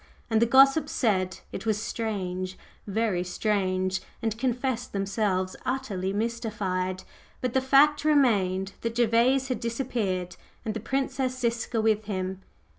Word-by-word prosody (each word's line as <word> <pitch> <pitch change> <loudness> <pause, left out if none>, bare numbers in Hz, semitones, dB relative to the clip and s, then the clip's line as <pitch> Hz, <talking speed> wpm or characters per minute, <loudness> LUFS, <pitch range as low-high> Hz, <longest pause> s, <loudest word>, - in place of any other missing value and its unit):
And 220 0 +3
the 235 - +4
gossips 275 +5 +5
said 185 -6 0
it - - -6
was 215 -1 +1
"strange, 185 -5 -3 0.3
very 205 -3 0
strange!" 185 -1 0 0.2
and 225 -2 -1
confessed 250 0 -2
themselves 195 -1 0
utterly 210 -8 -2
mystified. 200 -4 -2 0.4
But 250 -2 -2
the 265 - +3
fact 285 +3 +5
remained 200 -11 +2
that 230 0 -3
Gervase 240 +3 +3
had 255 - -1
disappeared 225 -7 -2 0.3
and 220 - -1
the 225 - -3
Princess 265 +2 -1
Ziska 235 -1 -1
with 215 -1 +2
him. 190 -2 -3
220 Hz, 130 wpm, -27 LUFS, 190-250 Hz, 0.4 s, gossips